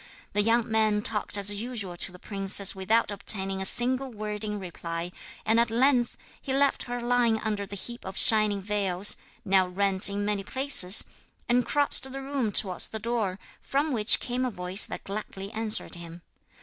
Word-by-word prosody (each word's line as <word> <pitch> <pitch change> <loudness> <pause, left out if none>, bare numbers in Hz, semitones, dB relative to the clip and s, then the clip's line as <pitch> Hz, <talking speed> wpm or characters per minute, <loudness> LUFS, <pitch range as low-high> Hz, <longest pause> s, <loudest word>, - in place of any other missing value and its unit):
The 205 - +2
young 230 +2 +1
man 215 -1 +1
talked 210 -2 -2
as 200 0 +2
usual 205 -3 -6
to 180 - -1
the 180 - -13
princess 195 0 +1
without 210 +3 0
obtaining 195 -1 0
a 190 - -1
single 255 +4 +3
word 210 -1 -5
in 210 -1 -4
reply, 170 -1 -6 0.3
and 225 +1 +2
at 235 0 +1
length 245 +1 +1 0.2
he 265 - -4
left 280 +1 +1
her 245 0 -5
lying 240 -2 +1
under 205 -2 -3
the 200 - -8
heap 235 +5 -5
of 190 0 -8
shining 215 -3 +5
veils 200 -1 +1 0.3
now 190 -2 +2
rent 195 +1 +1
in 205 0 -3
many 205 -1 -2
places 260 -6 +4 0.4
and 245 -1 +1
crossed 285 0 +3
the 270 - -6
room 270 -5 -2
towards 185 -3 +1
the 220 - -6
door, 220 -4 -3 0.2
from 290 +3 -2
which 220 -2 +6
came 250 +1 -3
a 255 - -1
voice 185 -1 0
that - - -8
gladly 195 -1 -7
answered 220 -1 0
him. 170 0 -7
210 Hz, 180 wpm, -26 LUFS, 195-240 Hz, 0.4 s, which